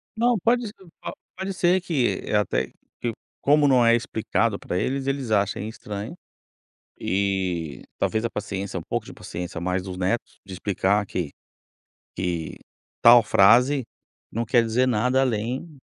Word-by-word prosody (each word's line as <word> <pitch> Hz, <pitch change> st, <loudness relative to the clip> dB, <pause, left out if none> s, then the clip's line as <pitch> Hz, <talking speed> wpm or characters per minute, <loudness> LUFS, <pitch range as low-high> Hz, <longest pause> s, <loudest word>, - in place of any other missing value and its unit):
Não, 235 Hz, +1 st, +3 dB
pode 240 Hz, 0 st, +2 dB
ser 205 Hz, -, -9 dB, 0.3 s
a -, -, -4 dB, 0.3 s
-pode 190 Hz, +1 st, -3 dB
ser 185 Hz, 0 st, +2 dB
que 150 Hz, -9 st, 0 dB
é -, -, -1 dB
até, 105 Hz, 0 st, +1 dB
que -, -, -23 dB, 0.7 s
como 145 Hz, +1 st, +5 dB
não 125 Hz, -3 st, +5 dB
é 115 Hz, 0 st, +6 dB
explicado 115 Hz, -2 st, 0 dB
para 90 Hz, -, -3 dB
eles, 135 Hz, +6 st, -1 dB
eles 135 Hz, -3 st, -2 dB
achem 100 Hz, 0 st, +1 dB
estranho, 105 Hz, +2 st, -6 dB, 0.8 s
e 95 Hz, -7 st, -1 dB, 0.2 s
talvez 110 Hz, 0 st, 0 dB
a 115 Hz, -, 0 dB
paciência, 100 Hz, -2 st, -4 dB
um -, -, -6 dB
pouco -, -, -2 dB
de -, -, -9 dB
paciência 90 Hz, 0 st, -6 dB
mais 90 Hz, +1 st, -1 dB
dos 95 Hz, -1 st, -6 dB
netos 95 Hz, +6 st, -2 dB
de 95 Hz, -, -9 dB
explicar 100 Hz, +2 st, +1 dB
que, 90 Hz, -6 st, -3 dB, 0.9 s
que 85 Hz, -3 st, -3 dB, 0.5 s
tal 120 Hz, 0 st, +9 dB
frase 120 Hz, +7 st, +5 dB, 0.5 s
não 115 Hz, +2 st, -1 dB
quer 120 Hz, +1 st, +4 dB
dizer 115 Hz, +3 st, +2 dB
nada 125 Hz, +2 st, +2 dB
além, 125 Hz, +6 st, -2 dB
110 Hz, 155 wpm, -24 LUFS, 95-130 Hz, 0.9 s, tal